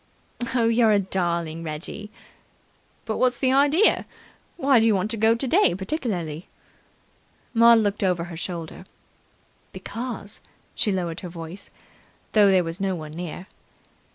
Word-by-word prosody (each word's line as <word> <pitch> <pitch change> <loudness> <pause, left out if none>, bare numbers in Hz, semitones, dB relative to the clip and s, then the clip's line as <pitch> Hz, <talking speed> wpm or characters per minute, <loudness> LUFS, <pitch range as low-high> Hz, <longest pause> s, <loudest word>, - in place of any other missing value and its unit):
"You're 230 -1 +3
a 210 - +5
darling, 170 -4 -2
Reggie." 165 +7 -6 1.0
"But 220 - -2
what's 250 -1 +2
the 260 -1 +2
idea? 290 +9 +4 0.5
Why 275 -6 +4
do 225 - +3
you 215 - +4
want 195 +3 -1
to - - -2
go 220 +1 +4
today 270 - +2
particularly?" 190 - -3 1.1
Maud 230 0 +7
looked 205 -2 0
over 180 -3 +1
her 175 -1 -8
shoulder. 175 +1 -6 0.8
"Because 225 -3 -6 0.2
" - - -37
She 210 - 0
lowered 175 -3 -2
her 180 - -7
voice, 170 +3 -8 0.6
though 210 -2 +6
there 185 -2 +4
was 165 +2 -5
no 190 -1 0
one 155 -3 -8
near. 175 +2 -7
195 Hz, 140 wpm, -24 LUFS, 170-230 Hz, 1.1 s, Maud